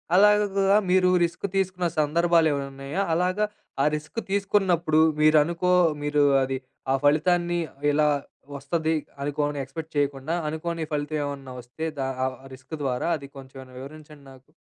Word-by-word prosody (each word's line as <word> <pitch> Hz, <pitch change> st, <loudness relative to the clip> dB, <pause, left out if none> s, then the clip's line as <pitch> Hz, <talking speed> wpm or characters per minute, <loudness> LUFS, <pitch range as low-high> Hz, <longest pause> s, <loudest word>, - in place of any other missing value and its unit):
అలాగా 200 Hz, 0 st, +4 dB
మీరు 185 Hz, 0 st, +4 dB, 0.2 s
రిస్క్ 170 Hz, +3 st, -5 dB
తీసుకున్న 185 Hz, -2 st, 0 dB
సందర్భాలేమన్నున్నాయా? 150 Hz, -1 st, +1 dB
అలాగా 185 Hz, +5 st, +1 dB, 0.4 s
ఆ -, -, +3 dB
రిస్క్ 155 Hz, +9 st, -5 dB
తీసుకున్నప్పుడు 190 Hz, -6 st, +2 dB, 0.2 s
మీరనుకో 160 Hz, +4 st, +3 dB, 0.3 s
మీరు 145 Hz, 0 st, +2 dB, 0.2 s
అది 130 Hz, 0 st, -2 dB, 0.3 s
ఆ -, -, +4 dB
ఫలితాన్ని 175 Hz, +3 st, +2 dB, 0.3 s
ఇలా 150 Hz, +1 st, +3 dB, 0.5 s
ఒస్తది 160 Hz, +3 st, -1 dB, 0.3 s
అనుకోని 145 Hz, 0 st, -2 dB
ఎక్స్‌పెక్ట్ 160 Hz, +4 st, -8 dB
చేయకుండా 140 Hz, +2 st, -1 dB, 0.2 s
అనుకోని 165 Hz, +1 st, -3 dB
ఫలితం 150 Hz, +1 st, -2 dB
ఏమన్నా 140 Hz, -2 st, -6 dB
వస్తే 125 Hz, +7 st, -7 dB
దా 135 Hz, -, -1 dB, 0.2 s
ఆహ్, 130 Hz, -1 st, -3 dB, 0.2 s
రిస్క్ 130 Hz, +5 st, -9 dB
ద్వారా 125 Hz, +2 st, -1 dB
అది 140 Hz, -1 st, -11 dB
కొంచెం 135 Hz, 0 st, -12 dB
ఏమైనా 130 Hz, -1 st, -14 dB
వివరించండి 150 Hz, +1 st, -12 dB
నాకు? 130 Hz, +3 st, -20 dB
155 Hz, 130 wpm, -25 LUFS, 140-175 Hz, 0.5 s, అలాగా